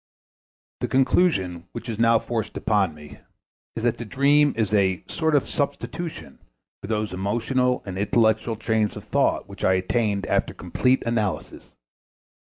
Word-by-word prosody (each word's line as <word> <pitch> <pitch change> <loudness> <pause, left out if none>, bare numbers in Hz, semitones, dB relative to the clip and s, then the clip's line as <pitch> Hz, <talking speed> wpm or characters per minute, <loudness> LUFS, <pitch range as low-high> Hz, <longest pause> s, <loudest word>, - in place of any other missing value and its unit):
The - - -1
conclusion 95 - +1
which 120 - -7
is 115 -2 -4
now 115 0 +5
forced 110 -1 -3
upon 100 -7 +1
me 75 -1 -13 0.6
is 115 - -4
that 120 -1 +1
the - - -3
dream 140 +6 +3
is 110 -2 0
a 95 -4 +2
sort 160 -2 0
of 140 - +2
substitution 145 - -4 0.4
for - - -7
those 105 -3 -2
emotional 120 +6 0
and 95 -1 -5
intellectual 110 +2 +2
trains 110 -1 0
of - - -8
thought - - +1
which - - -10
I 95 - +4
attained 100 +2 0
after - - 0
complete 125 +9 +1
analysis. 110 -5 -2
110 Hz, 150 wpm, -24 LUFS, 100-125 Hz, 0.6 s, now